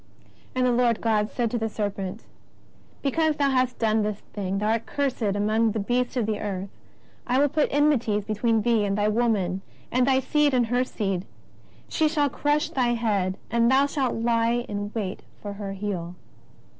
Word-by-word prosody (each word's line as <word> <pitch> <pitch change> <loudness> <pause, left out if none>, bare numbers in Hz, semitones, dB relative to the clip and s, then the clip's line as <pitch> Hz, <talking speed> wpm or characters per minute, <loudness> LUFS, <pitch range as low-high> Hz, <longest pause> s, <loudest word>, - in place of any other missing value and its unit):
And 255 0 +2
the 250 - +3
Lord 240 -2 +2
God 215 -2 +1
said 235 -3 -1
to 240 - -1
the 225 0 -1
serpent: 205 -1 -4 0.8
Because 310 +2 +2
thou 280 -1 +2
hast 255 -1 +1
done 220 -1 +2
this 210 -1 -1 0.2
thing, 195 -2 -2
thou 210 +2 0
art 225 0 0
cursed 280 -3 -1
among 215 +2 +1
all 215 - -1
beasts 245 +3 0
of 235 - +1
the 215 -1 -1
earth. 195 -1 -4 0.6
I 250 - +2
will 285 +2 +5
put 300 +1 +2
enmities 255 -8 +2
between 220 +1 +1
thee 230 -3 +3
and 200 0 0
the 210 +1 +2
woman, 205 -5 +1 0.3
and 250 +1 +2
thy 265 -1 +4
seed 295 0 +2
and 240 -2 +1
lier 245 +1 +3
seed: 195 -6 -2 0.6
she 315 - +1
shall 295 -2 +1
crush 295 +3 0
thy 245 -2 +1
head, 200 -5 0
and 235 0 +3
thou 270 +2 +5
shalt 280 -3 -1
lie 235 +1 +1
in 205 0 -4
wait 200 -3 -3 0.2
for 205 -1 -6
her 200 -1 -5
heel." 190 -3 -4
230 Hz, 185 wpm, -25 LUFS, 205-255 Hz, 0.8 s, will